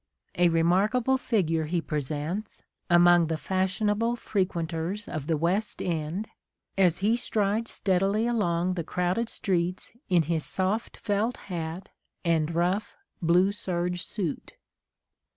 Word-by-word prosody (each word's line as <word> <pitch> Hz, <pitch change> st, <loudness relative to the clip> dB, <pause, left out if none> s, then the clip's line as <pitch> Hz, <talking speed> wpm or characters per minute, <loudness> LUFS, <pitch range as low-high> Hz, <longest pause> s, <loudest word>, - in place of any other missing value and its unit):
A 175 Hz, 0 st, +4 dB
remarkable 200 Hz, +10 st, +3 dB
figure 165 Hz, -11 st, +1 dB
he 170 Hz, +3 st, 0 dB
presents, 155 Hz, +6 st, -4 dB, 0.3 s
among 175 Hz, -1 st, +6 dB
the 160 Hz, 0 st, -1 dB
fashionable 205 Hz, +6 st, 0 dB
frequenters 180 Hz, -2 st, -2 dB
of 155 Hz, -3 st, -5 dB
the 160 Hz, -, +1 dB
West 185 Hz, +7 st, 0 dB
End, 170 Hz, +5 st, -2 dB, 0.5 s
as 180 Hz, -3 st, +3 dB
he 225 Hz, +2 st, +4 dB
strides 220 Hz, -1 st, 0 dB
steadily 195 Hz, +3 st, +1 dB
along 185 Hz, -7 st, +1 dB
the 175 Hz, -2 st, -3 dB
crowded 180 Hz, +7 st, -1 dB
streets 180 Hz, -1 st, -1 dB, 0.2 s
in 175 Hz, -3 st, +4 dB
his 160 Hz, 0 st, -1 dB
soft 195 Hz, +4 st, -1 dB
felt 215 Hz, +3 st, -1 dB, 0.2 s
hat 165 Hz, +3 st, -4 dB, 0.4 s
and 165 Hz, -1 st, +1 dB
rough 180 Hz, +5 st, 0 dB, 0.3 s
blue 180 Hz, +3 st, +4 dB
serge 180 Hz, -3 st, -2 dB
suit. 185 Hz, -8 st, -4 dB
180 Hz, 120 wpm, -27 LUFS, 170-205 Hz, 0.5 s, among